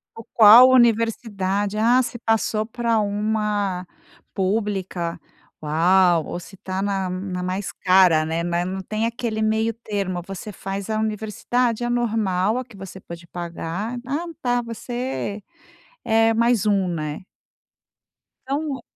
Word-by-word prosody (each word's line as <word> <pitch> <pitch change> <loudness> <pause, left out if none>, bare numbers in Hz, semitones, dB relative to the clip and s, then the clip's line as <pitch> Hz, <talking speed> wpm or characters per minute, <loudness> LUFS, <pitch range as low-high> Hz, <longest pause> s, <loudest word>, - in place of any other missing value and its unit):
Ou 225 - -9
qual 230 +3 +9
universidade, 220 -4 +1
ah, 235 +4 +4
se 245 -1 -4
passou 220 -1 0
pra 230 -1 0
uma 205 -2 -1 0.5
pública, 190 -4 -2 0.4
uau, 170 +2 +3
ou - - -5
se 195 +3 -13
está 190 +1 -4
na 195 -2 -1
na 185 0 -4
mais 185 +2 -3
cara, 180 -4 +4
né, 165 +1 -2
mas 175 0 -1
não 190 +1 -4
tem 215 +4 -2
aquele 230 -2 -3
meio 220 +1 +1
termo. 200 -5 -3
Você 195 +3 -7
faz 195 +1 -6
a 215 0 0
universidade, 220 +2 -1
a 240 - -1
normal, 220 -4 0
a 255 - -3
que 240 -3 -16
você 190 0 -9
pôde 170 -1 -11
pagar: 175 +6 -5
"Ah, 290 +6 -2 0.2
tá, 245 -1 +1
você 235 -2 -5 0.6
é 225 0 +3
mais 235 -1 +2
um", 200 -3 +2
né. 155 -1 -4 1.3
Então 280 0 -2
210 Hz, 135 wpm, -22 LUFS, 185-230 Hz, 1.3 s, qual